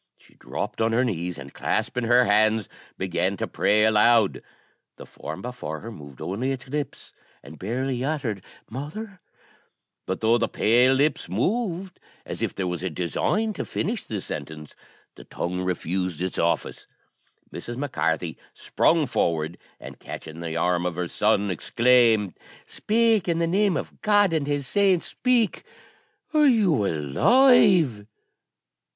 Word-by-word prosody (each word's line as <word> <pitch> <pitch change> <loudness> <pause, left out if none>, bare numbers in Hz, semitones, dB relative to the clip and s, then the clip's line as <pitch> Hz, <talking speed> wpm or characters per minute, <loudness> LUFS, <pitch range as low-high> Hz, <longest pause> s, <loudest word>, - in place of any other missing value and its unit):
She - - -23
dropped - - -5
on 115 0 +2
her 125 +3 +3
knees, 90 -6 -3
and, 70 0 -10
clasping 125 -1 -1
her 120 +1 +5
hands, 110 0 +3 0.3
began 95 +1 -1
to - - -2
pray 105 +1 +2
aloud. 110 -1 +4 0.5
The - - -11
form 80 +5 -8
before 120 -11 -6
her 115 - -8
moved 70 - -11
only 115 +8 -2
its 135 -1 -4
lips, 145 +2 -5 0.3
and 75 +2 -12
barely 125 +5 -2
uttered 130 - -2 0.2
"Mother"; 180 - -7 0.9
but 95 - -2
though 115 +2 +3
the - - +1
pale 125 +4 +3
lips 145 - 0
moved, 185 - -2 0.3
as - - -6
if - - -2
there 95 - -2
was 90 -1 -3
a 95 - -2
design 90 - -1
to - - -4
finish 225 +1 -2
the 105 -3 -5
sentence, 75 -3 -7 0.4
the - - -13
tongue 90 +1 -4
refused 90 -1 -2
its 90 +1 -3
office. 85 0 -1 0.7
Mrs. 120 0 -6
Mac 145 0 -4
Carthy 80 -2 -1 0.2
sprung 165 -2 +2
forward, 80 - -1 0.2
and - - -11
catching 80 +1 -9
the 85 -1 -4
arm 90 +1 +1
of 90 - -4
her 90 0 -2
son, 105 +1 +1
exclaimed, 115 +1 +3 0.3
"Speak! 225 -3 +1
in 170 -1 +1
the 170 - +1
name 190 +1 +2
of - - -7
God 205 -4 +3
and 150 -3 0
His 145 -1 -1
saints, 190 +3 +2
speak! 245 -4 +1 0.7
are 300 -1 +5
you 190 - +3
alive?" 160 - +4
115 Hz, 150 wpm, -24 LUFS, -, 0.9 s, her